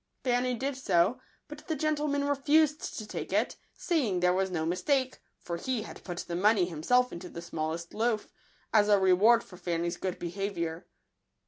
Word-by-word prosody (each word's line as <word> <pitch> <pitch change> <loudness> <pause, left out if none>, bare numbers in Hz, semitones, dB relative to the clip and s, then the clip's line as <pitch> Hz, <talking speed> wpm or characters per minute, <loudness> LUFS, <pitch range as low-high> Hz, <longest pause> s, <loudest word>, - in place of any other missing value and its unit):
Fanny 250 0 +1
did 270 +4 -2
so; 250 -1 +2 0.3
but 300 0 -9
the 320 - -1
gentleman 300 -1 0
refused 290 +2 +2
to 215 - -5
take - - -6
it, - - +1 0.2
saying 250 - 0
there 180 0 +3
was 190 +1 +1
no 160 -3 -2
mis 180 +2 -1
take, 260 +2 +1 0.2
for 170 -1 -5
he 240 +4 -2
had - - -11
put 175 -2 -6
the 170 - -3
money 200 +1 +4
himself 245 +10 +1
into 175 +1 -7
the - - -8
smallest 170 0 -4
loaf, 220 0 0 0.5
as 210 -1 +5
a 205 - +6
reward 195 +5 +5
for 180 - -14
Fanny's 170 -1 -2
good 185 -2 -3
behaviour. 175 -2 -4
205 Hz, 180 wpm, -29 LUFS, 175-260 Hz, 0.5 s, a